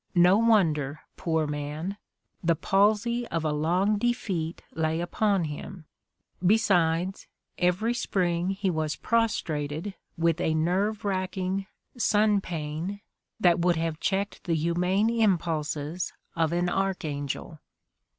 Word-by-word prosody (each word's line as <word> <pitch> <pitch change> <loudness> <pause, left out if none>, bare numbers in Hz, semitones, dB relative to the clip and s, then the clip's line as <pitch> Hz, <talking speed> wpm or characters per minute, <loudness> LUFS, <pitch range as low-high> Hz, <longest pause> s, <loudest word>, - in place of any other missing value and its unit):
No 180 +2 +6
wonder, 160 -11 +2
poor 160 -2 0
man; 150 +5 -4 0.5
the 170 0 +3
palsy 215 +7 +2
of 165 -1 -2
a 155 - +1
long 180 +8 +1
defeat 200 -9 -1
lay 160 0 0
upon 195 +2 +1
him; 155 +3 -6 0.6
besides, 180 -3 +2 0.3
every 185 +6 +2
spring 180 -6 0
he 195 -1 0
was 155 -2 -1
prostrated 170 -7 -1 0.2
with 165 0 +1
a 160 -3 +1
nerve 195 +7 0
racking 190 0 -1 0.3
"sun 210 -2 +3
pain" 165 +4 -4 0.4
that 175 -1 +4
would 175 0 +3
have 165 -1 -2
cheeked 200 +1 -2
the 170 - +1
humane 180 +7 +1
impulses 165 -6 0 0.2
of 165 -2 +1
an 175 +1 +1
archangel. 160 -6 -2
175 Hz, 115 wpm, -27 LUFS, 160-200 Hz, 0.6 s, No